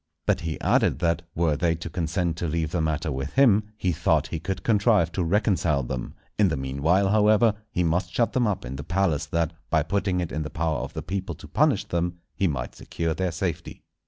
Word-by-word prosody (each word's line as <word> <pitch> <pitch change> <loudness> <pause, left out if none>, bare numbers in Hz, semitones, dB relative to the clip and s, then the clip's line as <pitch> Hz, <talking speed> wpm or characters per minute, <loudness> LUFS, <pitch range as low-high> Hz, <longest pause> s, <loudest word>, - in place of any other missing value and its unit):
But - - +2
he 80 -1 -4
added - - +3
that, 85 -2 +1
were 80 -3 +2
they 80 +3 +1
to 85 +1 -7
consent 85 +1 -1
to 85 - -2
leave 80 0 -1
the 90 - 0
matter 80 0 -1
with 65 +1 -4
him, 110 -6 +5
he 90 - 0
thought 80 - +1
he 80 - -3
could 95 +4 -4
contrive 105 -6 +3
to 90 0 -1
reconcile 85 -6 +1
them; 60 0 -5 0.2
in 105 - +6
the 80 - -1
meanwhile, 70 +9 +1
however, 110 +1 +4 0.2
he 90 - 0
must 90 +2 0
shut 115 +6 +1
them 125 -3 +2
up 100 -10 -2
in 65 +2 -6
the 75 - -5
palace, 85 -5 0
that, 85 0 0 0.2
by 80 - +3
putting 95 +2 0
it 85 -2 -3
in 80 - -2
the 75 - -4
power 80 -4 -1
of - - -6
the 80 - -5
people 95 0 -3
to - - -12
punish - - +2
them, 85 0 -2 0.2
he 95 - +1
might 65 -6 -3
secure 85 -1 -3
their 90 +1 -1
safety. 85 -1 -4
85 Hz, 220 wpm, -25 LUFS, 80-95 Hz, 0.2 s, in